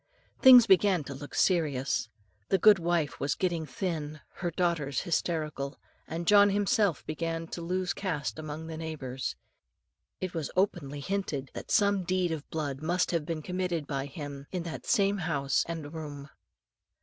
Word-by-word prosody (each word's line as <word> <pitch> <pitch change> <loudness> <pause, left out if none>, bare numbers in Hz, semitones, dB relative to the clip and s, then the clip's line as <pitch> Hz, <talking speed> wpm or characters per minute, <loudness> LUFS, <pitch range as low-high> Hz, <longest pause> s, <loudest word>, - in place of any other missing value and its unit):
Things 250 -3 +10
began 190 -4 +4
to 140 - -7
look 145 +2 -9
serious. 145 -9 +1 0.4
The 195 - +4
goodwife 175 -6 +3
was 140 -2 0
getting 170 -4 -1
thin, 155 -5 -3 0.2
her 175 - -1
daughters 165 -6 0
hysterical, 155 -5 -2 0.3
and 165 +1 -4
John 205 +2 +7
himself 205 - +1
began 165 +1 -3
to 170 - -5
lose 180 +2 -1
caste 160 -6 -3
among 155 +1 -6
the 160 -1 -6
neighbours. 145 -5 -4 0.8
It 185 -1 -4
was 160 -5 -3
openly 145 -7 0
hinted, 145 -6 -3
that - - -8
some 200 -2 +3
deed 180 -1 0
of 155 -2 -5
blood 145 -3 -3
must 175 +3 +1
have 165 -3 -1
been 160 -2 -3
committed 180 -3 -2
by 140 -1 -3
him, 140 -1 -7
in 180 -2 -2
that 170 -2 -7
same 200 0 +3
house 145 -5 +1
and 160 -3 -5
room. 145 -3 -7
165 Hz, 155 wpm, -29 LUFS, 145-185 Hz, 0.8 s, Things